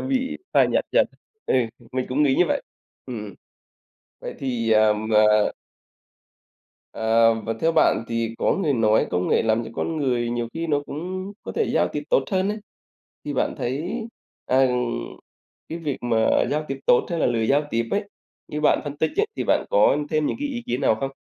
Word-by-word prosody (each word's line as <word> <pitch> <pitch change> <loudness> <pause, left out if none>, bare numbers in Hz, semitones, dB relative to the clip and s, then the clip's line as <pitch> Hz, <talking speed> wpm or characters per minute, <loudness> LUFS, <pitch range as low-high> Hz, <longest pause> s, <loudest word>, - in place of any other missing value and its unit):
bị 265 0 -1
phai - - +5
nhạt - - +1
dần, - - +4 0.4
ừ, - - +1 0.4
mình 130 0 -1
cũng 135 +4 +1
nghĩ 140 -3 +3
như 180 - +4
vậy. - - +1 0.5
Ừm, 125 -3 -5
ừm. 100 - -10 0.9
Vậy - - -6
thì, 120 -4 -1
ờm, 110 0 +3
ờ 105 -1 +4 1.4
Ờ, 115 +1 +3
và 115 - -3
theo 165 +1 +2
bạn 115 - +3
thì 115 -1 -2
có - - +2
người 155 -5 +2
nói 110 -3 +3
công 90 0 0
nghệ - - +3
làm 110 +1 +1
cho 110 - -8
con 165 - -2
người 125 -5 0
nhiều 120 -1 -2
khi 165 +1 -3
nó 145 -3 +1
cũng 185 +6 -5
có - - -6
thể 450 - +1
giao - - +3
tiếp - - -3
tốt - - +3
hơn 190 0 +1
ấy, 210 +1 -2 0.7
thì 145 - -3
bạn - - 0
thấy, 140 +9 -2 0.6
à, 130 +1 +4 1.0
cái 165 - -5
việc 150 -5 -3
mà 120 -2 0 0.3
giao 150 +1 -1
tiếp 135 0 -4
tốt 120 - +4
hay 170 - -1
là - - +2
lười 115 -2 +1
giao 145 +2 +3
tiếp 115 0 -1
ấy, 205 0 -1 0.4
như 150 - -4
bạn 150 - +3
phân 145 -1 -5
tích 160 +2 0
ấy, 420 - +2
thì - - -2
bạn - - +2
có - - +4
thêm 155 -1 +1
những - - -1
cái 290 - -1
ý 245 -3 -4
kiến 125 +2 -2
nào 130 -5 +3
không? 135 - -2
135 Hz, 205 wpm, -23 LUFS, 115-165 Hz, 1.4 s, phai